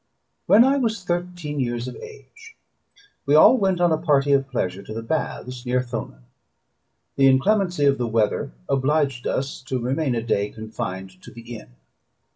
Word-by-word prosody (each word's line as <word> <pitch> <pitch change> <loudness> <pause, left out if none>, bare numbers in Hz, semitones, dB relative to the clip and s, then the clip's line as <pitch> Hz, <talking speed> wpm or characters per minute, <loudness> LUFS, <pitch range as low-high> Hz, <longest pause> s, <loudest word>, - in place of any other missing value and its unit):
When 220 +3 +7
I 270 +2 +3
was 225 -7 -1
thirteen 175 -4 -3
years 120 -1 -2
of 125 - -7
age, 455 +1 -13 0.7
we 145 - +4
all 210 +11 +8
went 190 -6 +1
on 175 -1 +3
a 160 - +1
party 145 -4 +2
of 135 -1 +2
pleasure 95 -7 -2
to 110 - -9
the 115 - -5
baths 125 -2 -4
near 125 0 0
Thonon: 120 - -6 0.9
the 135 -1 +5
inclemency 175 +4 +2
of 140 -1 +3
the 120 - -1
weather 110 - 0 0.2
obliged 135 -2 0
us 135 +1 -3
to 130 -1 -2
remain 130 +2 -1
a 115 - -2
day 105 -3 0
confined 95 -4 -7
to - - -12
the 120 0 -10
inn. - - -13
135 Hz, 170 wpm, -23 LUFS, 120-175 Hz, 0.9 s, all